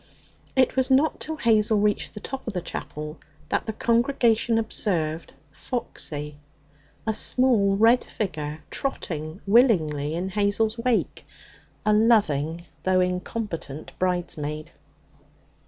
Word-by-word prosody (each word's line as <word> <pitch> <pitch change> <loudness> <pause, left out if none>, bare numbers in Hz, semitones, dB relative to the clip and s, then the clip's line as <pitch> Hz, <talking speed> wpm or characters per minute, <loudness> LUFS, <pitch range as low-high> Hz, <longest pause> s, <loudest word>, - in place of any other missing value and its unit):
It 260 -1 +3
was 260 0 +2
not 275 +4 +3
till 315 - -3
Hazel 220 -4 +3
reached 210 +1 0
the - - -5
top 265 +5 -7
of 225 - -3
the 180 - -1
chapel 150 -2 -6 0.3
that - - -1
the 220 - -2
congregation 235 -1 +2
observed 170 -8 -1 0.2
Foxy, 150 - -4 0.7
a 220 - +1
small 215 -4 +3
red 230 +4 +5
figure, 155 -7 -4
trotting 160 - -4
willingly 165 - +3
in 180 +3 -2
Hazel's 210 +3 +1
wake 240 -1 0 0.6
a 215 - +4
loving 170 -8 +2 0.2
though 185 0 +2
incompetent 180 -4 -3
bridesmaid. 160 -4 -2
205 Hz, 115 wpm, -25 LUFS, 160-230 Hz, 0.7 s, red